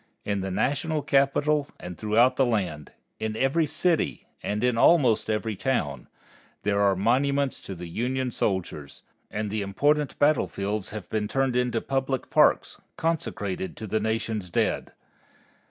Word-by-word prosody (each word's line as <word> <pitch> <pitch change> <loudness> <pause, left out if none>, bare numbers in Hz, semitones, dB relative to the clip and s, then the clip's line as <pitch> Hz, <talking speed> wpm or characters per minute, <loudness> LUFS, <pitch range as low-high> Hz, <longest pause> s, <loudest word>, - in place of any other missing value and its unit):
In 100 -1 -1
the 95 - -3
National 145 - 0
Capital 140 +1 +2
and 90 0 -7
throughout 110 +6 +3
the 135 - +3
land, 95 - -1 0.3
in 110 0 -2
every 145 +6 +2
city, 160 +3 0 0.2
and 105 +2 -2
in 125 -1 +2
almost 125 -4 +4
every 110 0 -1
town, 95 - -2 0.6
there 100 0 +1
are 100 -1 +4
monuments 135 +7 +1
to 95 - -7
the 90 0 -7
Union 125 +8 -2
soldiers, 90 -10 -3 0.3
and 105 -1 -3
the 110 0 -1
important 145 +9 +1
battlefields 105 -9 +1
have 105 -4 -7
been 105 -1 0
turned 135 +1 0
into 125 -2 +1
public 135 -1 -2
parks - - +3 0.2
consecrated 105 - -2
to 110 - -6
the 110 +1 0
Nation's 110 -3 -2
dead. - - 0
115 Hz, 145 wpm, -26 LUFS, 100-135 Hz, 0.6 s, almost